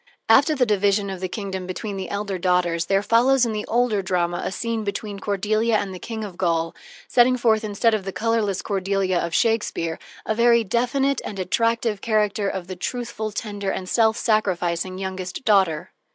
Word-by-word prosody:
After 280 +7 +5
the 260 -3 +3
division 205 -1 +1
of 190 - -6
the 185 - -2
kingdom 190 -2 -5
between 200 +2 -5
the 190 - -5
elder 200 -2 -3
daughters, 175 -2 +1
there 195 0 +2
follows 245 +4 +4
in 225 - -2
the 210 0 -4
older 235 -3 +1
drama 175 -2 -1
a - - -2
scene 230 +2 -2
between 205 0 -4
Cordelia 215 +3 +1
and 200 -2 -3
the 180 - -8
King 220 +2 -5
of 190 -4 -8
Gaul, 165 -2 0 0.3
setting 255 +1 +4
forth, 225 -3 +2
instead 215 +2 +1
of 215 -3 0
the 195 - -4
colorless 220 -3 0
Cordelia 195 -2 0
of 170 -1 -3
Shakespeare, 210 -8 0 0.3
a 220 - 0
very 235 +1 +4
definite 250 +6 0
and 205 - -6
attractive 230 +2 0
character 210 -2 +1
of 190 -2 -4
the 185 +1 -7
truthful, 220 +2 -4
tender, 205 -2 -4
and 185 - -3
self 220 +1 +3
sacrificing 185 -5 0
youngest 190 +2 -5
daughter. 185 -6 +2
205 Hz, 180 wpm, -23 LUFS, 185-225 Hz, 0.3 s, After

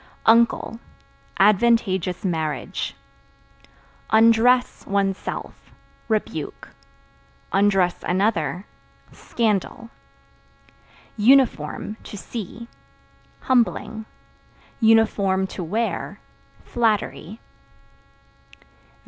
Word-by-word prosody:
Uncle 230 0 +3 0.6
Advantageous 195 -3 +2
marriage. 160 -4 -3 1.1
Undress 230 +3 +4
(One's 195 -1 +1
self) - - -6 0.5
rebuke; 220 -2 -3 0.8
(another) 190 -3 +1 0.5
scandal. 225 0 -2 1.3
Uniform 215 - +2
(To 205 - -9
see) 225 +2 -8 0.7
humbling; 225 -3 0 0.7
(to 200 -5 +2
wear) 220 +8 -3 0.4
flattery. 220 -3 -1
215 Hz, 50 wpm, -22 LUFS, 190-230 Hz, 1.3 s, Undress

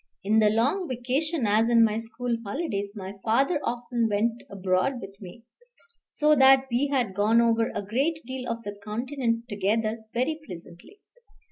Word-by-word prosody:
In 215 +3 +3
the 215 -1 +5
long 270 - +1
vacation, 260 +4 -1
as 215 +3 +3
in 230 -1 +5
my 215 -1 -1
school 235 +1 -3
holidays, 205 -4 -3
my 195 -1 -7
father 275 +8 +2
often 235 -1 -1
went 225 +3 0
abroad 185 +6 0
with 195 0 -11
me, 200 +5 -11 0.6
so 300 0 +2
that 265 0 +6
we 250 +4 +1
had 245 -8 0
gone 210 +4 +3
over 230 -1 +3
a - - -4
great 275 +10 0
deal 255 0 -5
of 230 0 -4
the 205 -1 -6
Continent 235 +1 -2
together 215 +1 -1
very 270 +6 -1
pleasantly. 180 - -12
230 Hz, 160 wpm, -26 LUFS, 210-260 Hz, 0.6 s, that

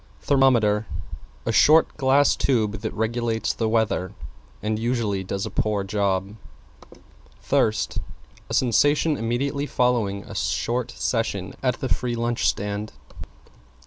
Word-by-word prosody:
=THERMOMETER= 115 -6 +3 0.6
A 115 - 0
short, 155 +8 +5
glass 140 0 +3
tube 110 -6 0
that 110 - -3
regulates 115 0 -1
the 110 -1 -1
weather 110 -5 0 0.5
and 110 0 -1
usually 115 -5 -1
does 95 +1 -3
a 110 - -6
poor 105 0 0
job. 100 0 -1 1.1
=THIRST= 110 0 +1 0.5
A - - -4
sensation 145 +5 +3
immediately 140 +5 -2
following 115 -8 0
a - - -10
short 120 +1 -1
session 100 -5 -2
at 125 -1 -1
the 130 - -1
free 125 -1 -1
lunch 120 0 0
stand. 105 +1 -3
115 Hz, 120 wpm, -24 LUFS, 105-125 Hz, 1.1 s, short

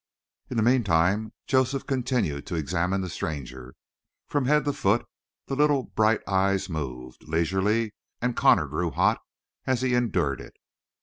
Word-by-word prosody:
In 125 - -3
the 110 - +3
meantime 105 -3 +2
Joseph 130 +1 +1
continued 125 - -1
to - - -3
examine 90 +5 0
the 95 - -3
stranger. 65 -5 -6 0.5
From 145 -3 0
head 150 +2 +3
to 145 - 0
foot 100 +1 +1 0.4
the 135 - -3
little, 145 -2 +3
bright 110 -1 +1
eyes 95 0 +1
moved, 65 -5 -6
leisurely, 95 +7 +1 0.3
and 125 0 -1
Connor 80 - +4
grew 80 +5 -2
hot - - +2 0.5
as 130 -1 +1
he 130 -1 +1
endured 105 - +1
it. - - -12
100 Hz, 145 wpm, -26 LUFS, 80-125 Hz, 0.5 s, Connor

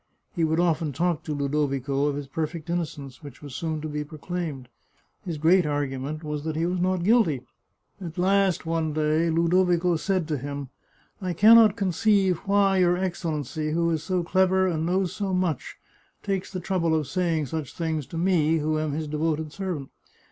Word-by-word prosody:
He 170 - 0
would 160 +1 +1
often 165 -4 +1
talk 170 +3 0
to 155 - -3
Ludovico 140 -1 0
of 145 - -1
his 145 0 -4
perfect 160 +3 -4
innocence, 150 -6 -4
which 145 -2 -12
was 145 -3 -8
soon 160 +1 -3
to 155 - -4
be 150 0 -3
proclaimed. 155 -3 -5 0.6
His 170 -6 -4
great 175 +5 +4
argument 145 0 -3
was 150 -1 -4
that 160 -1 -3
he 165 +2 0
was 180 +1 -1
not 185 0 0
guilty. 200 - +3 0.6
At 165 -1 -7
last, 190 -1 +2
one 160 -1 -1
day, 155 +2 +1
Ludovico 175 +1 +2
said 185 0 -1
to 150 -3 -1
him: 140 0 -5 0.3
" - - -37
I 185 -2 -2
can 215 +7 +7
not 220 -3 +7
conceive 195 -2 +2
why 195 -1 +3
your 180 -1 +3
Excellency, 155 -4 -2
who 170 0 +1
is 160 -2 -1
so 180 +1 -1
clever 190 +2 +3
and 165 -3 -1
knows 185 0 0
so 195 -2 -1
much, 180 -7 -1 0.5
takes 195 -2 -2
the 185 - -4
trouble 175 -3 0
of 155 -1 0
saying 165 +1 0
such 155 0 -5
things 160 -4 -2
to 165 - -7
me, 165 -3 +2
who 155 0 0
am 155 -2 -2
his 155 +1 -3
devoted 155 0 -2
servant. 180 -9 -4
165 Hz, 185 wpm, -25 LUFS, 150-180 Hz, 0.6 s, can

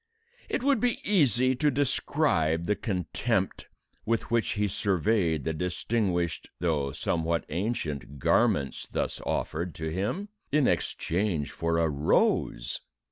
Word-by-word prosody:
It - - -1
would 280 -3 +3
be 245 +1 +1
easy 130 - +3
to 150 +3 +3
describe 130 - +1
the 105 - +1
contempt 95 -4 -1 0.4
with 115 0 -1
which 115 -1 +2
he 105 -1 +1
surveyed 95 -5 +1
the 80 - -1
distinguished 90 0 -1
though 75 -5 0
somewhat 85 +3 -1
ancient 75 - -3
garments 70 +1 +2
thus - - -2
offered 85 0 -2
to 80 +1 -3
him 105 - -2 0.2
in 145 -2 +4
exchange 85 -2 0
for 85 0 -1
a 85 -1 +3
rose! 70 -4 +1
90 Hz, 125 wpm, -28 LUFS, 80-115 Hz, 0.4 s, in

